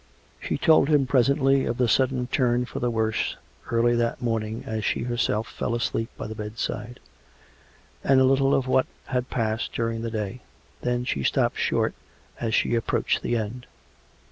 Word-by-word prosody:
She - - -2
told 155 -3 +4
him 145 -3 +4
presently 135 +1 +3
of 115 - -2
the 125 -2 +2
sudden 125 +2 +2
turn 125 -1 +1
for - - -6
the 120 - 0
worse 110 -1 -1 0.3
early 120 +1 +3
that 115 0 0
morning 115 -2 -2
as 110 -1 -3
she - - 0
herself 120 -2 0
fell 115 - -3
asleep 115 -1 -1
by - - -5
the 110 - -5
bed 105 0 -7
side; 115 +2 -4 1.0
and 135 -1 +5
a - - +5
little 135 +1 +3
of 135 - +1
what 130 0 +3 0.2
had 125 -1 -2
passed 110 -2 -1
during 115 -1 -1
the 115 - -3
day. 110 +2 -4 0.4
Then 125 0 -1
she 70 - -1
stopped - - +1
short - - +1 0.5
as 115 -1 0
she - - +1
approached 115 -1 0
the 120 - 0
end. 115 +3 -5
120 Hz, 175 wpm, -25 LUFS, 110-130 Hz, 1.0 s, and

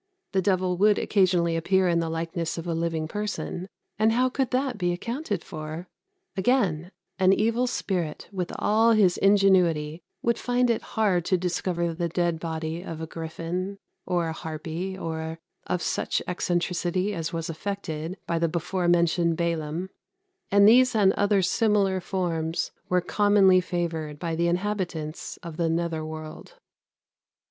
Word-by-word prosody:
The 190 - +2
devil 185 -1 +1
would 210 +1 +5
occasionally 180 -4 +2
appear 185 +3 +2
in 170 -1 +2
the 165 -1 -1
likeness 165 +1 -3
of 165 - -5
a 170 - -1
living 165 -1 -1
person; 205 -1 -4 0.3
and 220 +1 +4
how 255 +2 +3
could 260 0 -1
that 255 -3 -1
be 175 -1 +1
accounted 230 - -3
for? 155 +2 -7 0.5
Again, 190 -6 +1 0.3
an 190 0 +5
evil 230 +5 +1
spirit, 180 -10 -2
with 185 -3 -3
all 225 +2 +4
his 195 -5 +4
ingenuity, 180 -6 +3 0.2
would 235 0 +1
find 245 0 +2
it 230 - 0 0.2
hard 195 -6 +3
to 185 - +2
discover 175 -1 -1
the 170 +1 -2
dead 170 -1 0
body 160 0 -4
of 165 -4 -7
a 160 - -4
griffin, 165 +4 -4 0.3
or 175 -2 +1
a - - -3
harpy, 165 +4 -5
or 160 -2 -4 0.3
of 180 - -1
such - - 0
eccentricity 180 +2 -1
as 165 -2 -3
was 165 -1 -3
affected 165 -1 -4
by 170 -1 -1
the 165 0 +1
before 175 +2 -1
mentioned 170 -1 +3
Balam; 170 +1 -2 0.6
and 200 0 +6
these 250 +2 +6
and 195 -3 +5
other 205 -1 +2
similar 200 -2 +2
forms 170 -3 -2 0.2
were 180 0 +3
commonly 195 -1 +4
favoured 165 -4 -3
by 165 +1 -3
the 170 +1 +1
inhabitants 175 -4 -2
of 165 -2 -7
the 170 -1 +1
nether 165 -1 -1
world. 155 - -8
175 Hz, 155 wpm, -26 LUFS, 165-200 Hz, 0.6 s, and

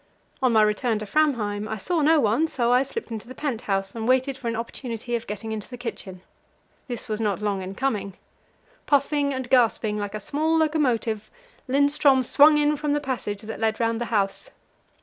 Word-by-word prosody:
On 255 -2 +3
my 220 -1 +6
return 215 +2 +1
to 215 - -5
Framheim 215 -6 0
I 220 - -3
saw 335 - -1
no 310 +2 +5
one, 235 +7 +2
so 240 -6 0
I 250 +1 +5
slipped 275 - -5
into 225 +1 -6
the 255 - -10
pent 260 -6 -3
house, 195 -4 -2
and 225 -1 -4
waited 260 +1 +2
for 260 -2 -7
an 230 - -1
opportunity 235 0 -4
of 230 - -4
getting 210 +2 -5
into 215 -2 -5
the 250 - -8
kitchen. 205 -6 -7 0.7
This 240 -3 -4
was 215 0 -3
not 205 -3 0
long 205 -2 -1
in 190 +1 -6
coming. 210 -7 -2 0.7
Puffing 285 0 +2
and 260 -2 -4
gasping 225 -4 +2
like 205 0 -4
a - - -3
small 310 +9 0
locomotive, 250 -9 0 0.4
Lindström 280 -1 +3
swung 300 +5 +6
in 295 0 +2
from 295 0 -1
the 295 - +1
passage 240 -7 -4
that 220 +1 -7
led 220 -1 0
round 230 0 0
the - - 0
house. 210 - -1
235 Hz, 200 wpm, -24 LUFS, 215-280 Hz, 0.7 s, my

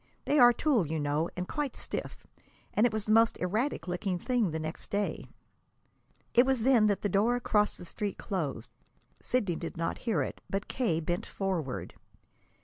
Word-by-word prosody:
They 295 - +3
are 245 -1 +9
tulle, 240 - +1
you 160 +1 -2
know, 150 +3 0
and 180 0 -3
quite 295 -4 -3
stiff, - - -6 0.5
and 220 +3 +4
it - - -4
was 215 -1 -2
the 215 - 0
most 225 +1 +5
erratic 215 +7 -1
looking 180 +1 -1
thing 240 +1 +1
the 160 - -3
next 155 +1 -5
day!" 205 0 -2 1.1
It 240 - +7
was 265 -3 +1
then 240 -4 +5
that 205 -2 0
the - - +2
door 205 +5 +2
across 210 -3 +1
the - - -9
street 205 +3 -4
closed. 150 - -3 0.5
Sidney 205 -9 0
did 165 0 -6
not 165 0 -2
hear 230 -3 0
it, - - -6
but 195 +1 -2
K. 220 -11 0
bent 175 +3 -2
forward. 175 -10 -3
205 Hz, 180 wpm, -30 LUFS, 175-235 Hz, 1.1 s, are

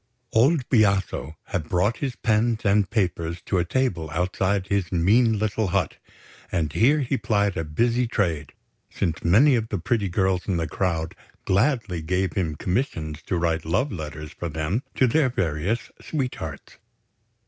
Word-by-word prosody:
Old 130 +4 +3
Biaso 100 - +2
had 85 -5 -4
brought 100 +6 +1
his 135 -4 -3
pens 110 0 +1
and 100 0 +3
paper 90 -6 -1
to 90 +2 -2
a - - +2
table 90 -6 -1
outside 95 +3 0
his 100 -3 -1
mean 110 +6 +3
little 110 0 0
hut; 90 -4 0 0.5
and 75 -4 -1
here 145 +7 +4
he 135 +1 0
plied 100 -4 +1
a 80 - -1
busy 115 +10 +1
trade, 85 - -1 0.4
since 85 -5 -2
many 115 - +5
of 115 -2 0
the 105 - -1
pretty 100 +2 0
girls 95 0 0
in 95 -4 +1
the 80 -1 -1
crowd 80 -1 -1 0.3
gladly 105 - +1
gave 90 +4 -1
him 85 -6 -1
commissions 85 - -2
to 90 - 0
write 85 -1 0
love 95 - 0
letters 75 -3 -6
for 85 - -5
them 80 - -1
to 130 - +4
their 130 +2 +3
various 95 - -1
sweethearts. 125 - -5
95 Hz, 160 wpm, -24 LUFS, 85-115 Hz, 0.5 s, many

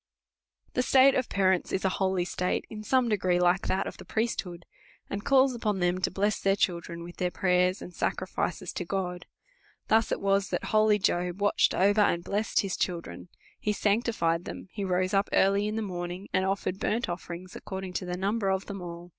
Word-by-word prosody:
The 250 - +2
state 265 +1 +6
of 255 - 0
parents 190 -2 +1
is 190 - -1
a - - +4
holy 190 -2 +1
state, 180 0 -1
in 215 -1 -6
some 255 +3 +2
degree 185 -5 +1
like 180 +2 +2
that 190 +1 0
of - - -6
the - - -10
priesthood, 185 -6 -3 0.5
and 200 +1 -3
calls 270 -1 +4
upon 215 -4 -1
them 180 +1 +1
to - - +1
bless 205 +2 0
their 195 0 +2
children 170 -3 -2
with 175 +1 -10
their 180 - 0
prayers 180 0 +1
and 180 - -10
sacrifices - - -2
to - - -3
God. 180 -1 -3 0.6
Thus 220 0 +3
it - - 0
was 195 0 +1
that - - -2
holy 215 -1 +3
Job 180 -2 0
watched 205 0 +3
over, 205 +3 +4
and 170 -4 +2
blessed 205 +3 0
his 195 -2 -3
children; 175 0 -4 0.3
he 210 - 0
aanctijicd 200 -6 +1
them; - - -8
he 205 - -4
rose 185 0 0
lip 195 +1 +2
earhj 200 +2 +3
in 215 - -2
the 225 - -1
morning, 180 0 -5
and 190 0 +2
offered 195 -1 -1
burnt 225 +2 0
ojl'ering 175 0 -6
s, 185 +4 -14
according 190 -4 -6
to 185 - -3
the 180 0 -3
numl)er 195 0 +1
of 190 - -6
them 195 -2 -6
all. 175 0 -8
190 Hz, 205 wpm, -28 LUFS, 180-210 Hz, 0.6 s, state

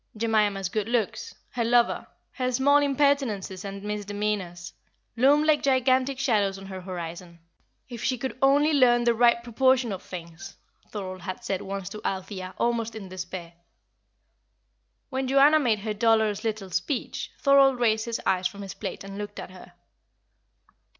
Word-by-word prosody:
Jemima's 210 -3 +1
good 210 +3 -3
looks, 235 -4 -2 0.2
her 240 - -1
lover, 235 +1 +2 0.2
her 255 -1 -2
small 270 +3 +4
impertinences 275 -9 0
and 200 0 -7
misdemeanours, 205 -4 -3 0.4
loomed 280 +5 +4
like 310 -2 +3
gigantic 260 0 +2
shadows 205 -7 +1
on 195 - -10
her 190 -1 -7
horizon. 175 -1 -7 0.5
"If 240 -3 -8
she 255 - 0
could 260 +2 -4
only 285 +3 +4
learn 240 -4 +4
the 235 0 +3
right 235 0 +3
proportion 250 0 +2
of 190 - -5
things!" 170 -2 -9 0.3
Thorold 185 -3 -6
had 185 +5 -6
said 195 -5 -2
once 195 -1 -5
to 215 - -8
Althea, 190 -1 -4
almost 230 -1 -1
in 200 -4 -8
despair. 180 -2 -7 1.6
When 265 0 -2
Joanna 280 +4 +5
made 230 -7 +1
her 215 0 -2
dolorous 220 -1 +2
little 215 -4 -3
speech, 270 - -3
Thorold 275 -2 +5
raised 220 -2 +2
his 235 -1 -3
eyes 185 -1 +2
from 200 +2 -9
his 195 - -7
plate - - -6
and 195 +1 -8
looked 205 0 -6
at - - -7
her. 185 - -14
220 Hz, 155 wpm, -26 LUFS, 195-255 Hz, 1.6 s, Joanna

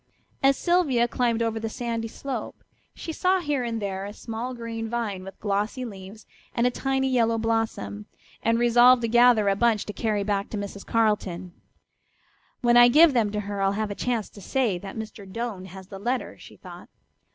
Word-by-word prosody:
As 275 0 +4
Sylvia 305 -10 +2
climbed 235 -1 0
over 225 -1 -1
the 225 0 -3
sandy 230 -1 -3
slope 270 +4 -6 0.3
she 325 - -6
saw 370 +3 +2
here 290 -6 -1
and 230 -1 -2
there 195 -2 -3
a 205 - -7
small 230 +4 -5
green 230 -1 -5
vine 220 -5 -3
with 195 +1 -11
glossy 210 +5 -1
leaves 200 0 -10 0.3
and 235 - +2
a 250 - +3
tiny 265 +1 0
yellow 230 -3 +2
blossom, 220 - -2 0.3
and 230 +1 +2
resolved 240 +1 +5
to - - +1
gather 240 -2 +5
a 195 - +3
bunch 225 0 +2
to 210 - -6
carry 210 -2 -1
back 200 -1 -1
to 215 - -4
Mrs. 200 0 -7
Carleton. 195 -5 0 1.1
"When 240 -1 +4
I 240 0 +9
give 305 +4 +6
them 225 -5 +2
to 210 0 -2
her 200 -1 -4
I'll 195 0 +2
have 215 0 -2
a - - -1
chance 230 0 -2
to 200 - -13
say 225 -4 0
that 195 +3 -8
Mr. 210 -3 -8
Doane 225 -4 -4
has 190 +1 -11
the 195 - -8
letter," 245 +5 -2
she - - -15
thought. - - -12
225 Hz, 195 wpm, -25 LUFS, 200-240 Hz, 1.1 s, I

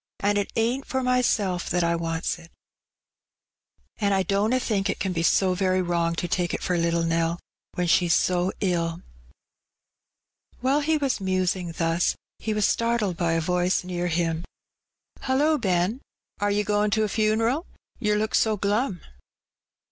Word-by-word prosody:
"And 205 +1 +1
it 200 - -3
ain't 240 +5 0
for 260 -1 -1
myself 230 -8 +1
that 175 +1 +1
I 170 0 +2
wants 165 +1 -2
it, 165 -1 -15 1.5
and 200 -2 +2
I 190 - +2
dunna 210 +6 +1
think 205 -5 -1
it - - -2
can 190 -2 -1
be 165 - -1
so 185 +2 +3
very 185 0 +1
wrong 170 -1 0
to 175 - -2
take 175 0 -1
it - - -6
for 180 - 0
little 170 0 +1
Nell, 165 0 0 0.4
when 180 - 0
she's 170 0 +3
so 180 +1 +1
ilL" 170 -3 -1 1.6
While 265 +4 +2
he 310 +2 +1
was 275 -7 -1
musing 185 -2 -1
thus, 165 +1 +1 0.2
he 220 - -3
was 210 -1 +1
startled 230 -5 +1
by 170 -1 0
a 165 - +1
voice 180 +2 +1
near 180 -1 -3
him 165 -1 -1 0.4
— - - -31
"Hullo, 290 +4 +2
Ben, 190 +3 0 0.4
are 205 +1 +1
'e 205 +1 +1
goin' 210 0 +1
to 220 +1 +1
a - - +1
funeral, 225 - +1 0.3
yer 210 -3 +1
look 215 +1 -1
so 220 -1 +2
glum?'' 205 -1 0
190 Hz, 165 wpm, -25 LUFS, 175-220 Hz, 1.6 s, so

